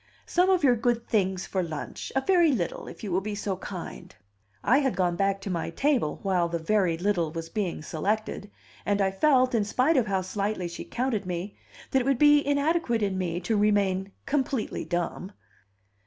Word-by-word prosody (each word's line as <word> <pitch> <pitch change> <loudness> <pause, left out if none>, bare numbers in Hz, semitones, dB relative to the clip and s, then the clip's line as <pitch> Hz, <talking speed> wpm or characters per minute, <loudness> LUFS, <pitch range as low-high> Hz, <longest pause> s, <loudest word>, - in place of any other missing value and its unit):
"Some 360 +2 +2
of 370 -4 +3
your 250 -3 +5
good 235 0 0
things 190 -4 0
for 190 - -1
lunch; 160 -4 -5
a 270 - +3
very 345 0 +4
little, 185 -10 -2
if - - -10
you 205 - -4
will 185 +2 +1
be 210 +1 -4
so 200 -2 -2
kind." 185 -2 -8 0.5
I 265 - +4
had 270 -3 0
gone 175 -2 +1
back 195 +1 +1
to 195 - -4
my 170 -2 -2
table 275 - 0
while 180 -3 +1
the 170 - -1
"very 170 0 +1
little" 175 -3 0
was 165 0 -6
being 180 -5 -3
selected, 205 +5 -2 0.3
and 205 0 0
I 195 -1 +2
felt, 255 +4 +3
in 225 -3 +2
spite 255 +9 +2
of 240 -4 +2
how 195 -2 0
slightly 200 -1 -2
she 170 - -7
counted 235 -6 -2
me, 180 +3 -4 0.4
that 265 - +3
it - - -3
would 275 -2 +2
be 295 +1 +6
inadequate 285 -4 +1
in 195 -2 0
me 175 -2 -2
to 220 +5 0
remain 200 -2 +2
completely 270 -4 -1
dumb. 175 +3 -3
205 Hz, 195 wpm, -27 LUFS, 185-255 Hz, 0.5 s, be